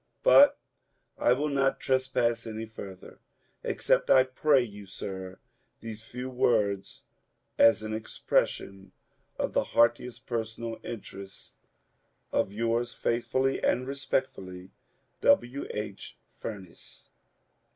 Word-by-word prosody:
But - - +7 0.6
I 120 - +4
will 145 +4 -1
not 135 -1 +1
trespass 125 -3 0
any 110 0 -5
further. 100 -4 -10 0.4
Accept, - - +1
I 130 - +7
pray 130 +1 +3
you, 105 -3 -10
sir, 95 -1 -7 0.4
these 110 -1 -8
few 125 +3 -6
words 105 -6 0 0.6
as 110 -2 +6
an 110 0 -4
expression 100 -3 -1 0.4
of - - -2
the - - +2
heartiest 115 +1 +2
personal 115 -1 -4
interest 100 -3 -9 0.8
of - - +1
Yours 115 +2 -1
faithfully 130 +3 0
and 125 - +2
respectfully, 95 -9 -3 0.5
W. 125 +4 +2
H. 105 -2 -6 0.2
FUBNE88. 95 -5 -10
115 Hz, 105 wpm, -28 LUFS, 100-125 Hz, 0.8 s, But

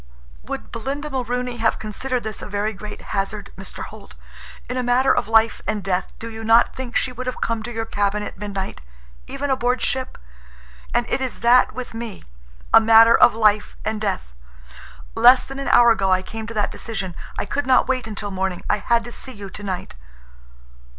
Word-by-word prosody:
"Would 60 - -7
Belinda 280 +6 -4
Mulrooney 250 -1 -2
have 225 -1 +1
considered 240 +4 -3
this 220 -1 -5
a - - -7
very 205 +2 -1
great 210 +1 -8
hazard, 200 +1 -3
Mr. 195 - -7
Holt? - - -12 0.5
In 250 - -4
a 255 - 0
matter 250 +2 +3
of - - 0
life 225 0 +3
and 210 -2 -1
death, 190 -1 -2
do 230 - -7
you 225 -1 -7
not 225 +1 +4
think 255 -2 -6
she 255 - +1
would 255 +1 -7
have 255 - -3
come 230 -1 -1
to 240 +2 -6
your 225 -1 -3
cabin 205 -1 -1
at - - -7
midnight—even 60 - -6
aboard 250 -1 +1
ship? 260 -1 -2 0.7
And - - +1
it - - -1
is 260 -2 -4
that 245 +2 +5
with 250 -2 -6
me—a - - -1
matter 225 +1 +7
of - - +6
life 215 -2 +2
and 215 -1 -2
death. 60 - -3 0.8
Less 250 - +6
than 270 0 -8
an 275 - -4
hour 240 -1 +6
ago 195 -4 +1
I 185 0 +3
came 220 +2 -7
to 230 - -6
that 210 -1 0
decision. 195 -6 -5 0.2
I - - -2
could 285 -1 -2
not 260 - +4
wait 255 -3 -1
until 205 -1 -5
morning. 190 -1 -2
I 210 - +2
had 235 +3 +2
to 240 - -8
see 260 +2 -7
you 200 -3 -9
tonight." 195 -3 -5
225 Hz, 190 wpm, -22 LUFS, 200-245 Hz, 0.8 s, matter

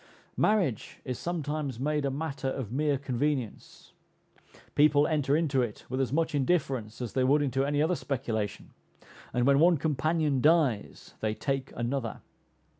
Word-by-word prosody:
Marriage 185 - +1
is 125 -2 -4
sometimes 150 -6 -3
made 150 +1 0
a - - +1
matter 140 -1 -3
of 130 -5 -3
mere 145 +2 +1
convenience; 130 -2 -3 0.8
people 145 0 +5
enter 150 -3 +1
into 145 -5 +1
it 115 -4 -4
with 130 +2 -1
as 130 - -1
much 160 +2 0
indifference 135 -6 0
as 120 - -5
they 130 - +2
would 145 +3 +4
into 135 -1 0
any 145 +1 +1
other 175 +3 +1
speculation, 115 -9 -3 0.6
and 125 0 +1
when 140 0 +5
one 170 +1 +5
companion 150 -1 0
dies 150 -8 +1
they 110 0 -1
take 135 0 -2
another. 120 -1 -3
140 Hz, 150 wpm, -29 LUFS, 130-150 Hz, 0.8 s, people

